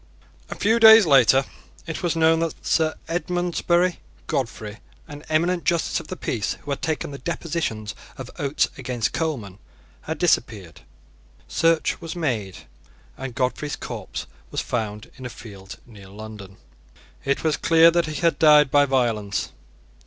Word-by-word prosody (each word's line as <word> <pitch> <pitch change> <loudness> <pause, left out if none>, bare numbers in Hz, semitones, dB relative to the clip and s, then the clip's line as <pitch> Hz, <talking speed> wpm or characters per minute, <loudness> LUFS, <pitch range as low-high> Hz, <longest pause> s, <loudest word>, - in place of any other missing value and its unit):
A - - -5
few 225 +3 +2
days 220 -2 +9
later 135 -2 +5 0.4
it 165 -2 -5
was 175 -2 0
known 160 0 +4
that 165 -1 -4
Sir 155 -1 +1
Edmondsbury 175 0 0 0.3
Godfrey, 115 -6 -4 0.3
an 145 0 -10
eminent 170 +3 +1
justice 170 -2 0
of - - -11
the 185 - -5
peace 110 -4 -2
who 145 - -6
had 140 - -3
taken 155 -2 -2
the 140 - -8
depositions 150 - -3 0.2
of - - -8
Oates 140 0 +1
against 120 -3 -2
Coleman, 115 - -3 0.4
had 160 - -5
disappeared. 110 - 0 0.7
Search 165 +1 +1
was 165 0 -6
made; 115 - -3 0.5
and 130 -3 -7
Godfrey's 135 +2 -1
corpse - - -6 0.2
was - - -3
found 105 -3 -4
in 130 - -9
a - - -8
field 100 -5 -11
near 105 -5 -14
London. 105 -2 -10 0.7
It 140 0 -1
was 155 -2 +2
clear 165 +1 +5
that 170 -1 +1
he 155 +1 -4
had 170 -1 +2
died 150 -3 +6
by 145 0 +5
violence. 115 -7 0
145 Hz, 150 wpm, -23 LUFS, 115-165 Hz, 0.7 s, days